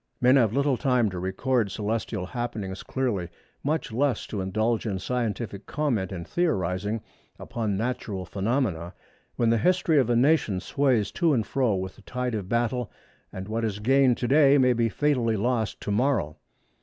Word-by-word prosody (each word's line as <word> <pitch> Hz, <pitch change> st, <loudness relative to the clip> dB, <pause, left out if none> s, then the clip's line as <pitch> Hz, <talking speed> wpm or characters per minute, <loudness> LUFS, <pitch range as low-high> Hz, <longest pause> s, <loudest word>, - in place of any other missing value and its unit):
Men 125 Hz, +2 st, +5 dB
have 115 Hz, -6 st, +4 dB
little 140 Hz, +1 st, +1 dB
time 125 Hz, -6 st, +2 dB
to 90 Hz, -, -5 dB
record 105 Hz, +5 st, 0 dB
celestial 105 Hz, 0 st, -2 dB
happenings 105 Hz, -4 st, -4 dB
clearly, 110 Hz, -10 st, -2 dB, 0.3 s
much 150 Hz, -2 st, -1 dB
less 135 Hz, +3 st, 0 dB
to 100 Hz, -, -4 dB
indulge 110 Hz, +4 st, 0 dB
in 100 Hz, -3 st, -1 dB
scientific 110 Hz, -1 st, -3 dB
comment 120 Hz, -12 st, -1 dB
and 85 Hz, -3 st, -6 dB
theorising 105 Hz, -, -1 dB, 0.3 s
upon 110 Hz, -4 st, -3 dB
natural 105 Hz, -4 st, -3 dB
phenomena, 95 Hz, -6 st, -1 dB, 0.4 s
when 115 Hz, -1 st, +2 dB
the 115 Hz, -, +3 dB
history 175 Hz, -2 st, +3 dB
of 125 Hz, -3 st, +1 dB
a 120 Hz, -, +3 dB
nation 125 Hz, -7 st, +3 dB
sways 125 Hz, -3 st, +1 dB
to 170 Hz, -4 st, +2 dB
and 110 Hz, -3 st, 0 dB
fro 125 Hz, -2 st, +1 dB
with 95 Hz, 0 st, -5 dB
the -, -, -15 dB
tide 125 Hz, +3 st, -3 dB
of 100 Hz, -4 st, -4 dB
battle, 120 Hz, -1 st, 0 dB, 0.4 s
and 95 Hz, +1 st, -7 dB
what 115 Hz, +2 st, -2 dB
is 105 Hz, -3 st, -1 dB
gained 130 Hz, +3 st, +3 dB
to 120 Hz, -, -2 dB
day 140 Hz, 0 st, +6 dB
may 125 Hz, -2 st, +4 dB
be 115 Hz, -1 st, +1 dB
fatally 125 Hz, -5 st, +1 dB
lost 110 Hz, -1 st, -1 dB
to 105 Hz, -, -3 dB
morrow. 105 Hz, -, +1 dB
115 Hz, 170 wpm, -26 LUFS, 100-130 Hz, 0.4 s, day